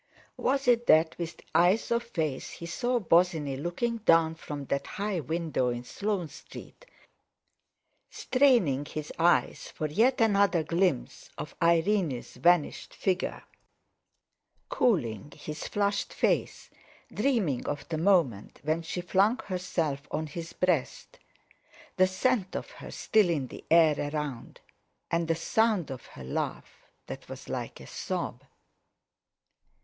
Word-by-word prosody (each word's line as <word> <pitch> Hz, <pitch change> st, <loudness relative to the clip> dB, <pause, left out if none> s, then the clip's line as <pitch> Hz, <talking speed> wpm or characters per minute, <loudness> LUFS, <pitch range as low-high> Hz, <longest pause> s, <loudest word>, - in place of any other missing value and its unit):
Was 270 Hz, 0 st, 0 dB
it 240 Hz, -1 st, +3 dB
that, 160 Hz, +1 st, +5 dB
with 170 Hz, -1 st, -4 dB
the -, -, -18 dB
eyes 180 Hz, +8 st, +3 dB
of 235 Hz, 0 st, +2 dB
faith, 160 Hz, -, -3 dB
he 170 Hz, -, -8 dB
saw 245 Hz, +9 st, 0 dB
Bosinney 165 Hz, -7 st, +2 dB
looking 175 Hz, -, -2 dB
down 165 Hz, -6 st, +4 dB
from 150 Hz, -3 st, -7 dB
that 140 Hz, +1 st, -2 dB
high 200 Hz, -2 st, -2 dB
window 160 Hz, -4 st, -1 dB
in 120 Hz, 0 st, -3 dB
Sloane 200 Hz, +4 st, -2 dB
Street, -, -, -12 dB, 1.2 s
straining 240 Hz, -, +3 dB
his 150 Hz, 0 st, -6 dB
eyes 175 Hz, +1 st, +2 dB
for 155 Hz, -, -4 dB
yet 230 Hz, -, +2 dB
another 200 Hz, -6 st, +3 dB
glimpse 165 Hz, -, -1 dB
of -, -, -6 dB
Irene's 170 Hz, -4 st, +2 dB
vanished 170 Hz, +5 st, +1 dB
figure, 185 Hz, -1 st, -1 dB, 1.3 s
cooling 145 Hz, -, 0 dB
his 150 Hz, +1 st, -6 dB
flushed 200 Hz, -1 st, -1 dB
face, -, -, 0 dB, 0.4 s
dreaming 205 Hz, -, 0 dB
of 145 Hz, -1 st, -4 dB
the 160 Hz, -2 st, -2 dB
moment 160 Hz, -, +2 dB
when 155 Hz, +3 st, 0 dB
she 170 Hz, +2 st, -4 dB
flung 195 Hz, +6 st, +2 dB
herself 170 Hz, -7 st, -2 dB
on 155 Hz, -, -2 dB
his 165 Hz, +2 st, -7 dB
breast—the 185 Hz, +2 st, -3 dB
scent 190 Hz, +1 st, 0 dB
of -, -, -5 dB
her -, -, -10 dB
still 215 Hz, -5 st, +2 dB
in 150 Hz, -6 st, 0 dB
the -, -, -10 dB
air 160 Hz, -2 st, +6 dB, 0.2 s
around, 145 Hz, -6 st, -5 dB, 0.5 s
and 170 Hz, 0 st, +1 dB
the 165 Hz, -, +2 dB
sound 205 Hz, -1 st, +1 dB
of 130 Hz, -2 st, -8 dB
her 65 Hz, -, -11 dB
laugh 65 Hz, -, -5 dB, 0.2 s
that -, -, -9 dB
was -, -, -9 dB
like -, -, -5 dB
a -, -, -11 dB
sob? -, -, -4 dB
170 Hz, 130 wpm, -28 LUFS, 150-200 Hz, 1.3 s, air